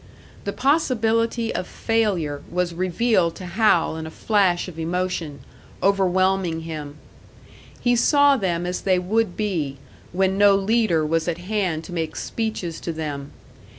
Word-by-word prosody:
The 200 - -1
possibility 230 -4 +1
of 180 - -3
failure 190 -11 -1
was 180 0 -1
revealed 185 0 +1
to 185 - -8
Hal 180 -3 +2
in 160 0 -5
a - - -6
flash 190 0 +1
of 165 -3 -9
emotion, 170 -4 -2 0.4
overwhelming 190 -3 +2
him. 155 -3 -6 0.8
He 245 -1 +2
saw 285 +3 +5
them 175 -7 -1
as 180 0 -3
they 185 -2 +2
would 190 +2 0
be, 165 -10 -2 0.3
when 190 +2 +1
no 205 -1 +6
leader 195 -5 +2
was 165 +2 0
at 170 -1 -1
hand 180 -4 -2
to 175 - -9
make 165 -2 -3
speeches 220 -7 -3
to 170 - -3
them. 145 -3 -5
185 Hz, 145 wpm, -23 LUFS, 165-215 Hz, 0.8 s, no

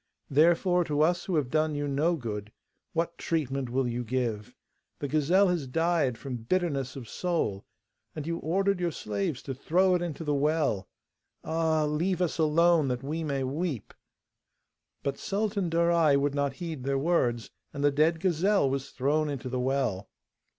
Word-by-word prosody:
Therefore, 175 +4 +4
to 150 -1 0
us 175 +3 +2
who 185 - -1
have 140 -5 0
done 155 -1 +1
you 145 0 -2
no 150 +5 +1
good, 105 -6 -5 0.4
what 170 +1 -2
treatment 135 -5 -1
will 130 +1 0
you 120 +1 -2
give? 115 -3 -2 0.4
The 145 - -3
gazelle 165 +7 +3
has 170 -6 -1
died 160 -3 +1
from 130 -1 -5
bitterness 135 0 -1
of 130 -4 -8
soul, 160 - -2 0.5
and 150 - -5
you 165 +1 -2
ordered 195 +4 +1
your 175 -1 +1
slaves 105 -2 -3
to 135 - -4
throw 180 +8 +2
it 180 - +1
into 165 -2 -4
the 150 -2 0
well. 145 -9 +1 0.5
Ah! 160 -1 +1
leave 170 +5 0
us 175 -2 -1
alone 160 0 +4
that 125 0 -2
we 155 +4 -3
may 140 -3 -1
weep.' 140 - -3 1.1
But 140 -1 -2
Sultan 200 -2 -1
Darai 165 -3 +3
would 140 0 0
not 140 -1 0
heed 160 -3 -6
their 135 +1 0
words, 130 -8 0 0.2
and 140 -1 -4
the 145 - +4
dead 155 +3 +2
gazelle 185 0 +2
was 135 +1 -2
thrown 150 +3 0
into 135 -3 -4
the 125 0 -2
well. 125 -7 -1
150 Hz, 170 wpm, -28 LUFS, 135-170 Hz, 1.1 s, Therefore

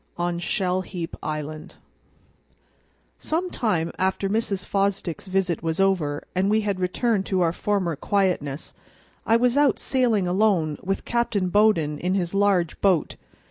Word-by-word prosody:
On 175 0 -1
Shell 180 +1 0
heap 180 -3 -6
Island 155 +2 -5 1.4
SOME 350 +3 -2
TIME 175 -9 0
AFTER 190 +1 0
Mrs. 205 -3 -1
Fosdick's 195 -3 -1
visit 185 -3 0
was 160 +1 -2
over 175 -7 +1
and 190 +2 +1
we 215 +1 +3
had 200 -3 -2
returned 195 +3 0
to 190 -2 +1
our 165 -1 +2
former 185 -4 -1
quietness, 175 -6 -1 0.5
I 225 - +5
was 250 +2 +2
out 290 -1 +4
sailing 235 -8 +1
alone 180 -6 +1
with 195 +1 -3
Captain 225 -6 0
Bowden 175 -8 +2
in 185 +2 0
his 175 -2 -1
large 195 -4 +1
boat. 185 -6 +2
190 Hz, 140 wpm, -24 LUFS, 170-205 Hz, 1.4 s, I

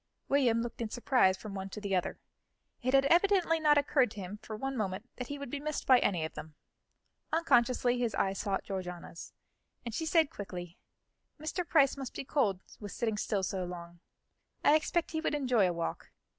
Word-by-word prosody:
William 245 -5 +3
looked 240 0 -6
in 225 - -2
surprise 245 -6 +3
from 210 0 -8
one 195 0 -5
to 210 - -7
the 200 -2 -1
other; 180 - -1 0.6
it 255 +2 +2
had 270 0 +5
evidently 350 0 +4
not 300 -1 +5
occurred 275 -3 +3
to 210 - -9
him 195 +2 -6
for 220 - -7
one 270 +5 -3
moment 205 0 -3
that 250 - -5
he 285 - -5
would 280 -3 -7
be 290 - -3
missed 305 +1 -3
by 255 -2 +7
any 175 -8 +1
of 160 - -7
them. 155 -1 -9 0.8
Unconsciously, 245 -6 +3
his 235 -3 0
eye 195 - +1
sought 195 0 -2
Georgiana's, 180 -3 -6 0.5
and 235 - -4
she 320 +7 -2
said 320 -2 +3
quickly: 180 -3 -7 0.6
"Mr. 320 +3 -3
Price 280 -5 +4
must 270 -3 -6
be - - -5
cold 215 -11 +1 0.2
with 205 -2 -7
sitting 225 -3 -1
still 205 -1 -1
so 190 0 -2
long; 175 -1 -8 0.6
I - - +6
expect 320 +1 0
he 315 0 -2
would 295 - 0
enjoy 250 -8 +3
a - - -1
walk. 170 0 -4
235 Hz, 200 wpm, -31 LUFS, 195-285 Hz, 0.8 s, by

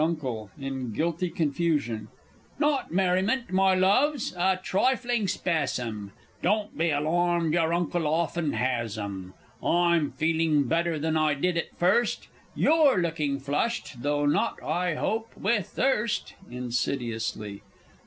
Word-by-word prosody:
U._ 130 -10 -2
(in 135 -4 -4
guilty 170 - -1
confusion). 145 - -1 0.5
Not 295 -2 +1
merriment, 190 +7 +1
my 190 0 +4
loves 240 +9 +2
a 185 +1 +2
trifling 240 +1 +1
spasm 125 - -2 0.3
Don't 210 +3 0
be 165 +1 +1
alarmed 165 +2 +1
your 165 -1 +2
Uncle 170 -1 0
often 160 0 0
has 120 -4 -1
'em! 95 -3 -6 0.3
I'm 170 -3 +2
feeling 160 -2 +2
better 165 +4 0
than 160 +1 -1
I 155 -2 +2
did 180 +5 0
at 170 - -3
first 200 +6 +1 0.3
You're 305 - +4
looking 155 -5 -1
flushed, 140 - -2
though 145 +1 0
not, 145 - +1
I 175 +1 0
hope, 225 +7 -2
with 205 -2 0
thirst? 235 -4 0 0.2
[_Insidiously. 115 -4 -3
165 Hz, 125 wpm, -27 LUFS, 140-185 Hz, 0.5 s, my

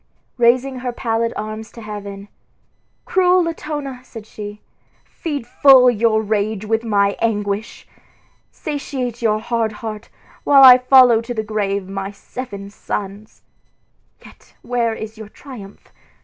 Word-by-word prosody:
Raising 255 +2 +2
her 250 0 -3
pallid 230 -1 -1
arms 215 +1 -6
to 230 - -11
heaven, 200 -1 -8 0.8
"Cruel 365 -1 +3
Latona," 295 -5 -5
said 225 -4 -11
she, 210 -1 -9 0.5
"feed 290 -7 -5
full 255 0 +6
your 220 -1 +1
rage 215 0 -1
with 225 +1 0
my 200 -3 +1
anguish! 210 -1 -2 0.6
Satiate 265 -6 -5
your 215 -2 +2
hard 225 0 -2
heart, 215 0 -7 0.3
while 275 -1 +6
I 255 -1 +10
follow 250 -3 +6
to 240 +1 -6
the 220 - -2
grave 200 -2 -2
my 195 0 -5
seven 200 -1 -8
sons. 205 +1 -6 0.8
Yet - - -18
where 235 -2 -1
is 220 0 -8
your 215 -2 -9
triumph? 215 -6 -12
225 Hz, 130 wpm, -19 LUFS, 210-250 Hz, 0.8 s, I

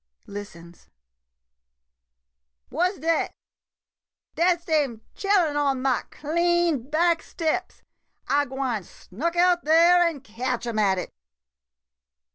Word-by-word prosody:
[Listens.] 175 -4 -10 1.8
What 360 +7 0
's - - -16
dat? 325 0 0 1.0
Dat 345 +1 +2
's 340 - -28
dem 280 -9 0
chillen 380 -7 +1
on 280 -2 +1
ma 265 -2 +1
clean 340 -3 0
back 335 +1 +2
steps. 335 +3 -3 0.4
I 285 +1 +2
gwine 260 -4 -2
snuk 280 - -5
out 350 0 +3
dere 335 +3 +5
an' 295 -5 -9
catch 240 +2 -4
'em 230 -2 -2
at 195 -3 +3
it. 180 - -5
300 Hz, 110 wpm, -25 LUFS, 240-345 Hz, 1.8 s, dere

